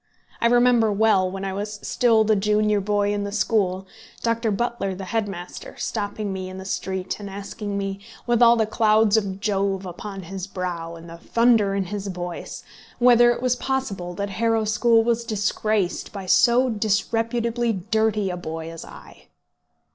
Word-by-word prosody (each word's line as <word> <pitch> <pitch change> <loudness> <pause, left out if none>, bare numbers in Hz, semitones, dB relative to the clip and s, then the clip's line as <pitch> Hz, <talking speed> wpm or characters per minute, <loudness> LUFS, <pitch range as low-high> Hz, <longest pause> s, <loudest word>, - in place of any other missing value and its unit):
I 235 - +4
remember 240 -2 +4
well, 200 -3 +3
when 195 +1 -5
I 190 - -3
was 205 +2 -4
still 230 -3 +3
the 215 0 +3
junior 210 0 +2
boy 205 0 +1
in 205 0 -2
the 200 - -4
school, 200 -3 0 0.4
Dr. 230 0 0
Butler, 210 -2 -2
the 190 +1 -7
head 220 +2 -1
master, 175 -2 -8
stopping 205 -1 -3
me 185 -1 -5
in 185 - -8
the 190 - -8
street, 190 0 -3
and 200 -1 -7
asking 200 +1 -5
me, 195 0 -3 0.3
with 240 -1 +1
all 235 0 +7
the 225 -2 +2
clouds 220 -1 +3
of 200 -3 -1
Jove 195 -2 -1
upon 195 +2 -7
his 190 +2 -6
brow 175 -3 -4
and 165 0 -11
all 165 - -9
the - - -24
thunder 230 -4 +3
in 200 - 0
his 200 +2 -5
voice, 175 -2 -6 0.3
whether 240 -1 +6
it 240 +1 -1
was 250 -1 +2
possible 235 -10 -3
that 200 +1 -3
Harrow 225 +2 +1
School 225 +1 +3
was 235 0 0
disgraced 215 -2 -1
by 195 -2 -7
so 245 +6 +4
disreputably 230 +2 0
dirty 215 0 0
a - - -3
little 175 -3 -6
boy 165 0 -5
as 165 - -8
I! - - -14
205 Hz, 180 wpm, -23 LUFS, 190-225 Hz, 0.4 s, all